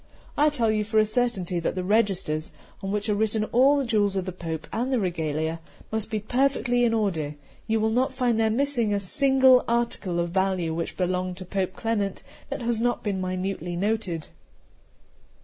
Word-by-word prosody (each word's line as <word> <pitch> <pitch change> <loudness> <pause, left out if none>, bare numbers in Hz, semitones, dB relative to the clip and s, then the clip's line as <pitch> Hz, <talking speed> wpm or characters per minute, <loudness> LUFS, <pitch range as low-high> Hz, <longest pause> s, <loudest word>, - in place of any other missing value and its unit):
I 300 +1 +4
tell 235 -7 +1
you 215 -1 +1
for 220 +1 -1
a 215 - +6
certainty 210 -6 -1
that 165 - -2
the 185 - -2
registers, 190 -6 0 0.3
on 195 - -3
which 210 +1 -1
are 210 - +2
written 215 +1 +1
all 270 +4 +5
the 275 - 0
jewels 205 -4 +1
of 190 -2 -1
the 185 - -3
Pope 165 -3 -5
and 245 +4 -1
the 255 - +2
regalia, 160 -3 -2 0.3
must 220 -1 -2
be 215 -1 -1
perfectly 245 +1 +1
in 235 - +3
order; 175 -10 -1 0.3
you 225 0 +1
will 220 +1 +1
not 255 +4 +1
find 250 -3 +1
there 220 0 +3
missing 235 -3 +1
a - - +1
single 265 +4 +4
article 230 -7 -1
of 170 0 0
value 190 -3 0
which 165 +1 -4
belonged 180 0 -1
to 185 - -8
Pope 185 0 -2
Clement 210 -4 -2 0.3
that 280 -2 -4
has 235 -1 0
not 240 +1 0
been 195 -3 -1
minutely 185 -1 -3
noted. 190 -4 -1
210 Hz, 190 wpm, -26 LUFS, 185-235 Hz, 0.3 s, a